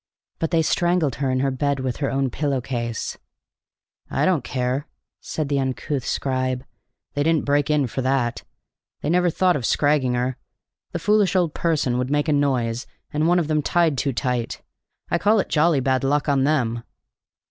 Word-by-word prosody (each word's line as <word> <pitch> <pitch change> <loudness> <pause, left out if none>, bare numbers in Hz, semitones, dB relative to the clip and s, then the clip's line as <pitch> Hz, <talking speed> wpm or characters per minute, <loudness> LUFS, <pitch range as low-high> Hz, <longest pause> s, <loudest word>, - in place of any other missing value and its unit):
"But 165 - 0
they 165 -1 +2
strangled 175 -4 +1
her 140 -1 0
in 130 0 +1
her 135 0 +1
bed 140 +1 0
with 130 -2 -2
her 140 - -1
own 135 -1 0
pillow 140 -1 -1
case!" 120 -2 -4 0.9
"I - - +1
don't 175 -8 +2
care," 130 +4 -2 0.3
said 155 -2 -3
the 140 -1 0
uncouth 135 +1 -2
scribe. 130 -1 -1 0.5
"They 145 - -1
didn't 160 +1 +2
break 145 0 +2
in 150 -2 +3
for 130 +2 -3
that. 130 -2 0 0.6
They 150 - -1
never 180 0 +3
thought 180 +1 +2
of 135 - -2
scragging 140 0 +2
her. 125 +1 -1 0.5
The - - -2
foolish 210 -2 +2
old 175 -4 +2
person 145 -7 0
would 125 0 -1
make 145 +2 +1
a 155 - +3
noise, 125 -4 0 0.3
and 155 +2 +1
one 175 +1 +4
of 170 -4 +1
them 155 -1 +1
tied 165 0 +2
too 135 +2 0
tight. 125 -1 -2 0.5
I 170 - +2
call 215 +3 +4
it - - -1
jolly 155 -2 +3
bad 130 +1 +1
luck 145 +2 +1
on 135 -2 +3
them." 120 -6 +1
140 Hz, 185 wpm, -23 LUFS, 130-155 Hz, 0.9 s, one